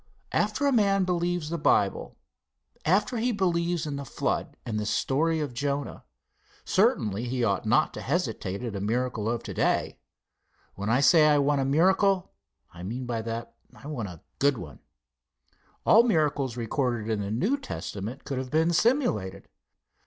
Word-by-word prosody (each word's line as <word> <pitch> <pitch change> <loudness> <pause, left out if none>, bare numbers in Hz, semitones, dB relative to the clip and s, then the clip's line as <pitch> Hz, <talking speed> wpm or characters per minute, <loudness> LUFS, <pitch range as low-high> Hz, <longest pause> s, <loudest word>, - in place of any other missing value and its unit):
After 215 +7 0
a 280 - +4
man 200 -5 +3
believes 175 -3 -1
the 170 - -2
Bible, 100 -8 +1 0.7
after 200 +9 +2
he 240 +3 +1
believes 175 -5 0
in 145 -2 -4
the 140 - -5
flood 135 - -3
and 115 - -4
in - - -1
the 105 - -2
story 160 +8 +1
of 145 -5 -3
Jonah, 140 +3 -3 0.6
certainly 105 +2 +1
he 125 0 -1
ought 100 -1 0
not 150 +8 +3
to - - -6
hesitate 125 - -2
at 115 -4 -4
a 100 - -3
miracle 115 0 -1
of 120 0 -2
to - - -6
day. - - 0 0.7
When 100 +2 -4
I 125 +4 +3
say 155 +2 +6
I 150 -1 +5
want 140 0 +2
a - - 0
miracle, 185 +6 +3 0.4
I 85 - -11
mean 120 +8 -4
by 120 -2 -2
that, 115 +1 -5 0.2
I 115 - -15
want 130 -8 -4
a 85 -3 -11 0.2
good 140 -2 +3
one. 80 -8 -9 1.1
All 225 - +7
the 240 - 0
miracles 145 - +1
recorded 120 -1 -1
in 110 -2 -1
the 100 - -4
New 135 - +1
Testament 125 - -6
could 135 -2 -3
have 130 -1 -5
been 160 +3 +2
simulated. 225 - +1
140 Hz, 175 wpm, -27 LUFS, 115-170 Hz, 1.1 s, All